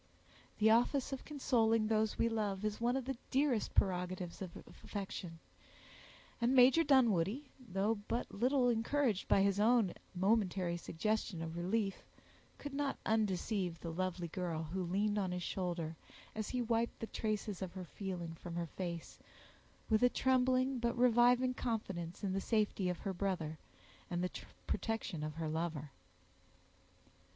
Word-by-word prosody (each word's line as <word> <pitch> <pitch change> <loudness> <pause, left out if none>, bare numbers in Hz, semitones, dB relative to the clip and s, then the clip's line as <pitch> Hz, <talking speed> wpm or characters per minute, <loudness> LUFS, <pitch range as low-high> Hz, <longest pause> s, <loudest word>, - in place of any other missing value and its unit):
The 220 +1 +5
office 250 +4 +3
of 265 - -5
consoling 230 -6 +2
those 220 0 +1
we 230 - +3
love 210 -3 -1
is 215 +1 -2
one 245 +2 +2
of 265 - -3
the 270 0 -2
dearest 265 -4 +1
prerogatives 180 -1 0
of 185 -3 -6 0.3
affection; 190 -4 -5 1.0
and 245 +3 +3
Major 260 +6 +7
Dunwoodie, 240 - +3 0.2
although 205 +3 0
but 240 - -2
little 250 +4 +3
encouraged 235 -2 +1
by 195 - +5
his 200 0 +2
own 220 -3 +4 0.2
momentary 190 -2 +2
suggestion 175 +1 -2
of 165 0 -5
relief, 195 +3 -1 0.6
could 290 -1 -7
not 280 -1 -1
undeceive 200 -4 0
the 165 - -5
lovely 180 0 -2
girl, 170 -2 -3
who 190 - -1
leaned 205 +4 +1
on 190 -2 -1
his 180 0 -3
shoulder, 170 -4 -2 0.4
as 215 -1 -3
he 250 -1 -1
wiped 230 0 0
the - - -3
traces 215 -3 -3
of 185 -2 -4
her 185 -1 -6
feeling 175 -2 -5
from 170 +1 -8
her 170 0 -1
face, 170 0 -6 0.7
with 220 -1 +3
a 245 - +6
trembling, 255 0 +2
but 235 0 0
reviving 245 +1 +5
confidence 195 -8 -3
in 190 -2 0
the 195 - 0
safety 210 -4 +1
of 180 - -2
her 195 - -2
brother, 175 -5 -2 0.5
and 175 0 -1
the 180 - -1 0.3
protection 225 -8 -2
of 155 0 -4
her 165 -1 -3
lover. 155 -2 -3
205 Hz, 150 wpm, -36 LUFS, 180-235 Hz, 1.0 s, Major